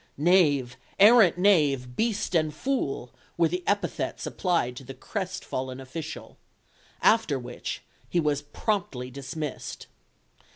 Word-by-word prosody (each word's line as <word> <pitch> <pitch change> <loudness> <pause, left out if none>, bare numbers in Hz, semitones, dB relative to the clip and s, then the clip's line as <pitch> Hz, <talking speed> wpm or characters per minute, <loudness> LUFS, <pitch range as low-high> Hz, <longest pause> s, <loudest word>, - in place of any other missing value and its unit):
"Knave, 145 -6 +3 0.2
arrant 210 -4 +7
knave, 145 -10 +3
beast 220 - -1
and 155 -2 +2
fool," 140 - -2 0.3
were 170 -1 +4
the 180 +2 -3
epithets 205 0 -1
applied 170 -10 0
to 135 - -8
the 135 +1 -9
crestfallen 180 - -4
official. 150 +4 -8 0.6
After 220 -11 +4
which, 125 -1 -6 0.3
he 175 - +1
was 150 -3 +1
promptly 145 - -3
dismissed. 140 +2 -6
155 Hz, 115 wpm, -27 LUFS, 130-190 Hz, 0.6 s, arrant